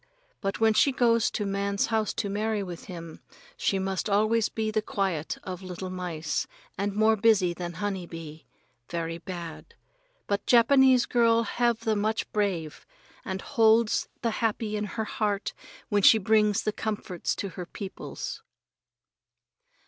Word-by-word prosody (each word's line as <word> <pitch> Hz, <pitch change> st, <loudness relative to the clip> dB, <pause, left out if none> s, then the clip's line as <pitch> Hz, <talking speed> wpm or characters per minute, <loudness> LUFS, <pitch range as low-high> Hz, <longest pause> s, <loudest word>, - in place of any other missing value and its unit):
But 195 Hz, -1 st, -2 dB
when 220 Hz, 0 st, +4 dB
she 275 Hz, -, +4 dB
goes 230 Hz, -3 st, +3 dB
to 210 Hz, -, -3 dB
man's 200 Hz, 0 st, 0 dB
house 220 Hz, -1 st, +1 dB
to -, -, -1 dB
marry 210 Hz, +1 st, -1 dB
with 175 Hz, -3 st, -8 dB
him, 170 Hz, -3 st, -8 dB, 0.4 s
she 195 Hz, -, 0 dB
must 190 Hz, +2 st, -2 dB
always 215 Hz, +2 st, +3 dB
be 220 Hz, -1 st, -2 dB
the 215 Hz, 0 st, +1 dB
quiet 190 Hz, -7 st, -2 dB
of 185 Hz, -1 st, -6 dB
little 185 Hz, 0 st, -6 dB
mice 170 Hz, -4 st, -3 dB, 0.3 s
and 200 Hz, +1 st, -2 dB
more 220 Hz, +1 st, +4 dB
busy 200 Hz, -4 st, +3 dB
than 175 Hz, 0 st, -5 dB
honey 190 Hz, 0 st, -3 dB
bee. 160 Hz, -2 st, -9 dB, 0.4 s
Very 165 Hz, -1 st, -3 dB
bad. 170 Hz, -3 st, -8 dB, 0.5 s
But 200 Hz, 0 st, -2 dB
Japanese 255 Hz, +1 st, +6 dB
girl 230 Hz, -1 st, +3 dB
have 235 Hz, 0 st, 0 dB
the 220 Hz, -1 st, +1 dB
much 215 Hz, +2 st, 0 dB
brave, 185 Hz, -7 st, -2 dB, 0.4 s
and 190 Hz, -2 st, -4 dB
holds 225 Hz, 0 st, +3 dB
the 230 Hz, -, +1 dB
happy 220 Hz, -1 st, -1 dB
in 210 Hz, 0 st, -1 dB
her 220 Hz, +1 st, -3 dB
heart 210 Hz, -2 st, -1 dB, 0.4 s
when 205 Hz, -2 st, +2 dB
she 220 Hz, -, +8 dB
brings 210 Hz, 0 st, +3 dB
the 215 Hz, -, -1 dB
comforts 210 Hz, -5 st, -3 dB
to 200 Hz, -, -4 dB
her 180 Hz, 0 st, -7 dB
peoples. 195 Hz, +1 st, -6 dB
205 Hz, 150 wpm, -27 LUFS, 185-220 Hz, 0.5 s, she